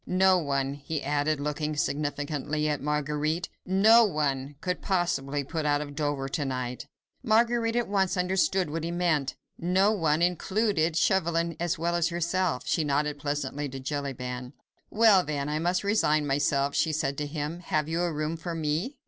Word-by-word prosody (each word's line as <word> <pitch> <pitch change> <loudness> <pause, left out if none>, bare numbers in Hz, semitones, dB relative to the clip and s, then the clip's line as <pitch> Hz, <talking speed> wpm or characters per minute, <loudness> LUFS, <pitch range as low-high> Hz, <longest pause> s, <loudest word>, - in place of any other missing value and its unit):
No 185 0 +4
one," 140 -3 -1
he 145 +2 -5
added, 145 +1 0
looking 150 +1 -2
significantly 145 +1 -1
at 150 -1 -1
Marguerite, 150 +3 -1 0.2
"no 215 +5 +6
one 145 -7 -1
could 180 -1 -3
possibly 145 -7 0
put 160 +3 -3
out 145 -1 +2
of 145 -1 -6
Dover 145 -2 -2
to 145 +2 -2
night." 125 -2 -4 0.3
Marguerite 230 0 +2
at 240 -1 +1
once 195 -2 +1
understood 180 -2 +1
what 160 0 -3
he 165 - -2
meant. 170 -5 0 0.2
No 185 +4 +3
one 165 -5 +1
included 180 -1 +1
Chauvelin 170 -2 +1
as 175 +1 -1
well 170 +2 -1
as 170 0 +2
herself. 170 -2 -1
She 165 - +1
nodded 145 0 0
pleasantly 145 0 -3
to 135 +1 -7
Jellyband. 130 -2 -4 0.4
"Well, 210 -4 +5
then, 145 -3 -3
I 150 +1 -1
must 175 +3 0
resign 155 -8 +2
myself," 140 0 +1
she 160 - +1
said 140 -2 -1
to 145 - -2
him. 150 +2 -4
"Have 155 -3 -1
you 165 +2 -1
a 175 -1 0
room 155 +1 -2
for 170 +1 -5
me?" 165 - -2
155 Hz, 170 wpm, -27 LUFS, 145-180 Hz, 0.4 s, no